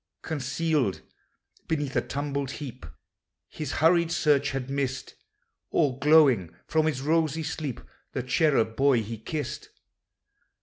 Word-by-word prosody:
Concealed 150 - -1 0.7
beneath 145 -4 -2
a - - +3
tumbled 140 -1 -3
heap 130 - -8 0.6
His 150 -3 -5
hurried 170 +1 +3
search 145 -4 +2
had 135 -2 -3
missed, 135 -1 -3 0.6
All 135 -2 +1
glowing 140 - +4
from 155 0 +1
his 135 -4 -1
rosy 160 0 +1
sleep, 150 -4 -4 0.3
The 130 - -2
cherub 130 -4 +2
boy 135 -3 +3
he 110 +1 -6
kissed. 145 +4 -5
140 Hz, 120 wpm, -27 LUFS, 130-155 Hz, 0.7 s, glowing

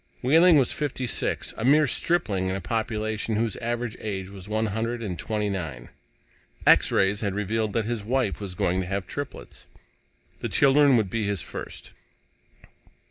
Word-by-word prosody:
Wehling 165 +5 +6
was 135 -4 +3
fifty 140 -3 -3
six, 120 - -1
a 110 - -4
mere 150 +4 +5
stripling 120 - 0
in 95 - -1
a - - -2
population 110 +2 -2
whose 115 0 0
average 120 -1 -3
age 95 -3 -4
was 100 0 -10
one 110 +1 0
hundred 115 +3 -2
and 90 -5 -4
twenty 105 -1 -2
nine. 80 -11 -5 0.8
X - - +6
rays 100 +1 +2
had 100 -3 -2
revealed 105 +1 -1
that 115 -1 0
his 115 -2 -3
wife 115 -2 -1
was 95 -3 -6
going 90 +1 0
to 90 - -5
have 95 0 -2
triplets. 145 +6 -7 0.7
The - - -3
children 140 -1 +5
would 105 -5 0
be 110 -3 -1
his 100 -4 -1
first. - - -8
110 Hz, 170 wpm, -25 LUFS, 100-120 Hz, 0.8 s, Wehling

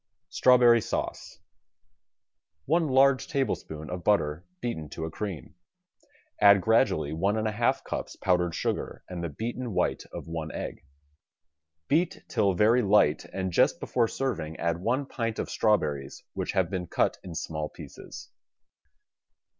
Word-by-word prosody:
STRAWBERRY 120 -2 +5
SAUCE - - -4 1.2
One 165 +2 +2
large 135 0 +4
tablespoon 100 - -3
of 90 -1 -5
butter 80 -6 +1
beaten 80 - -4
to 80 - -5
a 80 - -5
cream. 95 - -6 0.9
Add 100 -1 +8
gradually 90 - +2
one 100 +7 0
and 110 0 0
a - - 0
half 115 +3 +1
cups - - -5
powdered 90 -2 +1
sugar - - -3
and 90 -2 -6
the 85 - -2
beaten 115 - -4
white 90 - +1
of - - -7
one 80 -1 -4
egg. - - -6 1.0
Beat 165 +4 +1
till 100 -2 +1
very 110 +7 +4
light 100 -8 +3
and 95 -1 -4
just - - +3
before 120 -2 +1
serving 105 -13 -3
add 85 0 -1
one 125 +7 0
pint' 115 -4 -3
of - - -3
strawberries 75 -11 0
which - - -3
have 95 -3 +1
been 90 -2 -3
cut - - 0
in 90 -3 -8
small 75 -1 -3
pieces. - - -11
100 Hz, 145 wpm, -28 LUFS, 80-120 Hz, 1.2 s, Add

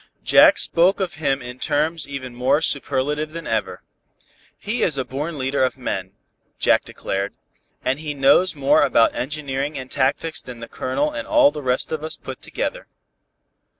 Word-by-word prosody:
Jack - - +7
spoke 180 +4 +3
of 190 -1 -2
him 135 -3 0
in 125 +1 -8
terms 155 +2 0
even 135 -3 -6
more 130 +4 +2
superlative 150 +1 -1
than 165 0 -6
ever. - - -2 0.7
"He 215 +4 -3
is 150 -5 +1
a 130 - -1
born 145 +6 -4
leader 135 0 0
of 130 0 0
men," 95 -7 -4 0.4
he - - +4
declared, 100 +1 -4 0.5
"and 135 +3 0
he 150 -2 -5
knows 140 +6 +4
more 145 +2 +3
about 115 -5 +4
engineering 140 +1 -3
and 130 -1 -7
tactics 145 +4 0
than 125 -1 -9
the 115 0 -8
Colonel 290 - -1
and 295 -1 -5
all 300 -2 +5
the 150 - -6
rest 125 -2 -1
of 155 -1 -3
us 155 0 -3
put 130 -1 -9
together." - - -4
140 Hz, 170 wpm, -22 LUFS, 130-155 Hz, 0.7 s, Jack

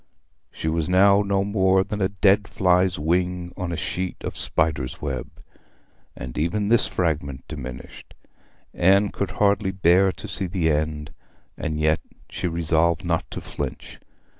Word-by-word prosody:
She - - -6
was 80 +1 0
now 100 +2 +5
no 100 -1 0
more 95 -2 +2
than 105 +1 -5
a 95 - +2
dead 100 0 +3
fly's 90 -1 +2
wing 90 +2 -1
on 90 -3 -4
a 85 - -3
sheet 90 +2 -3
of - - -5
spider's 75 -6 +1
web; 70 -4 -4 0.9
and 65 +3 -6
even 100 +6 0
this 120 0 +4
fragment 75 -6 -2
diminished. 65 -5 -9 0.6
Anne 100 +3 +4
could 100 - -3
hardly 100 -1 +2
bear 95 0 +3
to - - -9
see 95 - -2
the 85 -3 0
end, 75 -1 -2 0.4
and 75 0 -3
yet 75 0 +2 0.3
she - - -3
resolved 85 +1 +1
not 85 -1 -1
to - - -6
flinch. - - -6
90 Hz, 150 wpm, -23 LUFS, 80-95 Hz, 0.9 s, now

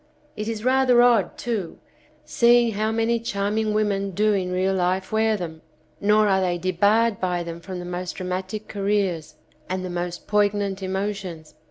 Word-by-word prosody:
It 215 - -4
is 225 0 -4
rather 255 -2 +5
odd 235 -7 +3
too, 220 -8 -3 0.5
seeing 235 -1 +4
how 215 +1 -1
many 225 +1 +1
charming 215 0 -1
women 205 -2 0
do 210 +3 +1
in 185 -2 -1
real 185 +1 +1
life 185 +1 0
wear 220 0 +2
them, 160 -4 -7 0.4
nor 210 +1 +3
are 190 -1 +3
they 180 -1 0
debarred 200 +5 +2
by 180 -2 -1
them 170 0 -7
from 185 +2 -7
the 175 - -6
most 180 0 -4
dramatic 185 +3 -4
careers 195 -6 -1 0.3
and 185 0 -2
the 180 - -5
most 175 0 -4
poign 205 0 +2
ant 195 -1 -3
emotions. 190 -4 -4
200 Hz, 170 wpm, -23 LUFS, 180-215 Hz, 0.5 s, rather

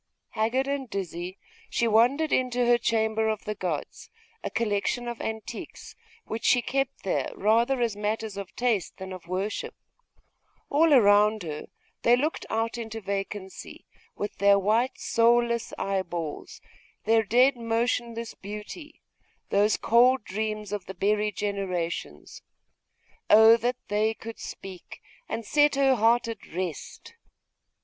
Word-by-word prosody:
Haggard 230 +5 0
and 275 -2 -3
dizzy, 180 -1 -5 0.3
she 235 - +1
wandered 250 +8 +3
into 250 -1 +1
her 240 0 +4
'chamber 220 -1 +1
of 215 -1 -2
the 210 - -2
gods'; 175 -7 -5 0.3
a - - -2
collection 230 +2 -1
of 235 -1 -5
antiquities, 220 -1 -7 0.3
which 220 - -5
she 245 - +4
kept 270 +2 -2
there 190 - -1
rather 235 +6 +2
as 230 -3 0
matters 210 0 -3
of 200 -1 -8
taste 235 -7 -1
than 190 -1 -7
of 180 -2 -10
worship. 190 +4 -3 1.0
All 315 +3 +4
around 210 -4 +5
her 150 -2 -6 0.3
they 240 - +5
looked 295 +6 -2
out 225 +2 -1
into 225 -1 -5
vacancy 195 -1 -6 0.3
with 205 - -5
their 200 0 +5
white 220 +6 +1
soulless 235 0 +2
eyeballs, 175 -5 -4 0.4
their 225 +1 +4
dead 250 +5 +4
motionless 230 0 -2
beauty, 210 - -9 0.5
those 205 +2 +3
cold 250 +2 +4
dreams 215 +1 -4
of 205 -3 -4
the 190 - -7
buried 210 +2 0
generations. 190 -5 -4 0.9
Oh 220 +2 +8
that 245 +2 -1
they 215 +2 +1
could 225 0 -9
speak, 190 -2 -9 0.3
and 230 - -4
set 295 +3 +3
her 275 -1 +4
heart 230 0 +3
at 230 - -6
rest! 185 - -6
220 Hz, 135 wpm, -27 LUFS, 200-240 Hz, 1.0 s, Oh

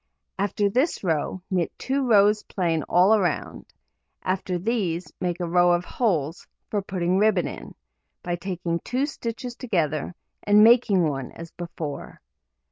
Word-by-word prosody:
After 205 +1 +1
this 255 - 0
row, 170 +1 -1
knit 180 -3 0
2 270 +1 -1
rows 210 0 +5
plain 170 -6 -1
all 195 +5 +5
round; 175 -6 -2 0.6
after 185 -1 -1
these, 180 -4 -2
make 175 -1 -1
a 175 - -1
row 175 +1 +4
of 175 +1 0
holes 165 - -1 0.2
(for 205 - 0
putting 185 -1 0
ribbon 205 -4 +3
in) - - -9 0.5
by 175 0 -1
taking 175 -2 -3
2 255 +8 -1
stitches 240 -3 -5
together, 170 - -1 0.3
and 210 +1 +5
making 220 -7 +5
one 135 -4 -4
as 165 -1 -10
before. 165 -4 -7
185 Hz, 140 wpm, -25 LUFS, 170-210 Hz, 0.6 s, rows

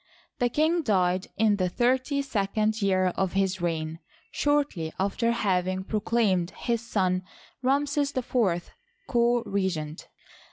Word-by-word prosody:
The 245 -1 +2
king 315 +6 +2
died 185 - +1
in 210 -1 +3
the 185 -2 +1
thirty 260 - +1
second 215 -2 0
year 185 -2 +2
of 190 -2 0
his 190 -1 0
reign, 160 -1 -2 0.3
shortly 285 - 0
after 200 +5 +1
having 185 -4 0
proclaimed 210 -4 +1
his 235 -2 -1
son 185 -6 0 0.4
Ramses 280 +2 +1
IV 215 -9 0 0.4
co 240 -2 +2
regent. 185 -7 -2
205 Hz, 120 wpm, -27 LUFS, 185-245 Hz, 0.4 s, in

